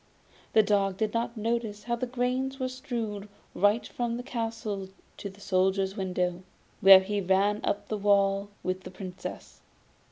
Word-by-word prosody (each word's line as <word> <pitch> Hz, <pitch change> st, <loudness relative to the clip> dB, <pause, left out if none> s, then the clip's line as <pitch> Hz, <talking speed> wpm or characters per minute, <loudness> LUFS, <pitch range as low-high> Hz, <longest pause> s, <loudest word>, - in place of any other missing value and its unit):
The 220 Hz, -, +6 dB
dog 200 Hz, -2 st, +1 dB
did 215 Hz, 0 st, -1 dB
not 235 Hz, 0 st, -2 dB
notice 220 Hz, -2 st, -2 dB
how 235 Hz, +1 st, -1 dB
the 250 Hz, +2 st, -3 dB
grains 255 Hz, +2 st, -1 dB
were 255 Hz, 0 st, -1 dB
strewn 225 Hz, -5 st, -4 dB, 0.2 s
right 205 Hz, +4 st, +3 dB
from 235 Hz, -1 st, -3 dB
the 245 Hz, -, -5 dB
castle 225 Hz, -6 st, -4 dB, 0.3 s
to 200 Hz, -, -5 dB
the 195 Hz, +1 st, -16 dB
Soldier's 190 Hz, 0 st, +1 dB
window, 180 Hz, -2 st, -1 dB, 0.4 s
where 195 Hz, -2 st, +10 dB
he 200 Hz, +1 st, -2 dB
ran 195 Hz, +3 st, +2 dB
up 200 Hz, -, -1 dB
the 215 Hz, -, -3 dB
wall 200 Hz, 0 st, +3 dB
with 185 Hz, +1 st, -2 dB
the -, -, -9 dB
Princess. 185 Hz, 0 st, -8 dB
205 Hz, 160 wpm, -28 LUFS, 195-230 Hz, 0.4 s, where